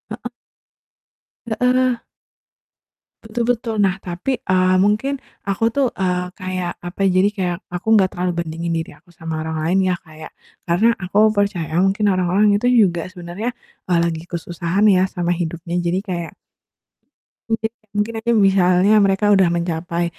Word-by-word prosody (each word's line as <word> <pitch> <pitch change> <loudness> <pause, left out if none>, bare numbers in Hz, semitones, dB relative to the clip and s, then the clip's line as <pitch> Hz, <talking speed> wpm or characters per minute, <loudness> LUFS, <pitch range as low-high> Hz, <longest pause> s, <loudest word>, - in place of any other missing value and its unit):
Heeh. - - -8 1.2
Heeh. 250 +1 +1 1.2
Betul 225 +2 -2
betul, 230 -1 -4
nah, 195 0 0
tapi, 185 +9 -3
eee, 185 -5 +2
mungkin 225 +8 +1 0.2
aku 200 +3 +1
tuh, 270 +3 +1
eee, 180 -1 -2
kayak 185 -1 -3
apa, 175 +2 -9
jadi 190 +1 +4
kayak 180 -3 -1
aku 180 +5 -1
nggak 200 -4 +5
terlalu 180 0 0
bandingin 165 +1 -4
diri 165 -1 -4
aku 175 -1 -23
sama 160 -1 -5
orang 160 0 -3
lain 170 +5 +1
ya, - - +1
kayak 155 -1 -12 0.3
karena 215 +7 +2
aku 200 +3 +3
percaya 175 -6 -1
mungkin 200 +2 +2
orang-orang 195 +2 +3
itu 210 - -4
juga 185 -8 +3
sebenarnya, 180 +6 -5 0.4
eee, 170 - +4
lagi 170 -1 -1
kesusahan 175 +3 -1
ya 185 -2 +4
sama 175 -2 -1
hidupnya, 170 0 -4
jadi 175 +2 0
kayak 175 -5 -5 1.2
Iya, 225 -1 0 0.3
mungkin 210 +2 0
aja 225 +1 -7
ini 220 - +4
misalnya 185 +1 +3
mereka 195 +1 +1
udah 190 -3 +4
mencapai 170 0 -2
185 Hz, 150 wpm, -20 LUFS, 175-210 Hz, 1.2 s, nggak